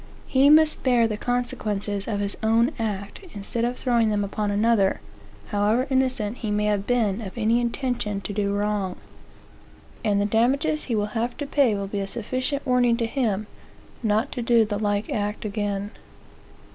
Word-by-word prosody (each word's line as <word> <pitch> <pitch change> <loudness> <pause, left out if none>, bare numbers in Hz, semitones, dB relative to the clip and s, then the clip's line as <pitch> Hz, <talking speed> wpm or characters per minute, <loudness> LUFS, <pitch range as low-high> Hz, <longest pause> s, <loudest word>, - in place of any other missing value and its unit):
He 275 +1 +4
must 310 0 +5
bear 245 -3 +3
the 215 - -2
consequences 210 -4 -2
of 205 -2 -1
his 200 0 -2
own 225 +4 +3
act, 205 -2 -3 0.2
instead 205 +3 -3
of 245 +1 -1
throwing 235 -3 +2
them 205 -1 0
upon 205 +1 -2
another, 205 -1 +2 0.5
however 210 +4 +2
innocent 255 -4 0
he 220 - -4
may 210 0 +1
have 205 -1 0
been 230 -4 +1
of 200 +1 -8
any 230 +1 +2
intention 235 -4 -2
to 205 - -5
do 200 -1 0
wrong. 205 -2 -1 1.1
And 205 -2 +2
the 205 - +2
damages 275 +8 +1
he 235 - -1
will 210 0 -1
have 235 +1 -2
to 290 - -3
pay 275 -6 +2
will 200 0 -3
be 200 +1 -4
a 195 - -2
sufficient 255 +7 -2
warning 250 -2 +3
to 230 - 0
him 225 -4 -1 0.6
not 220 +3 +1
to 250 - -4
do 235 -1 +4
the 205 -1 -3
like 205 -1 -1
act 210 +1 -2
again. 205 -1 -2
220 Hz, 175 wpm, -24 LUFS, 205-245 Hz, 1.1 s, must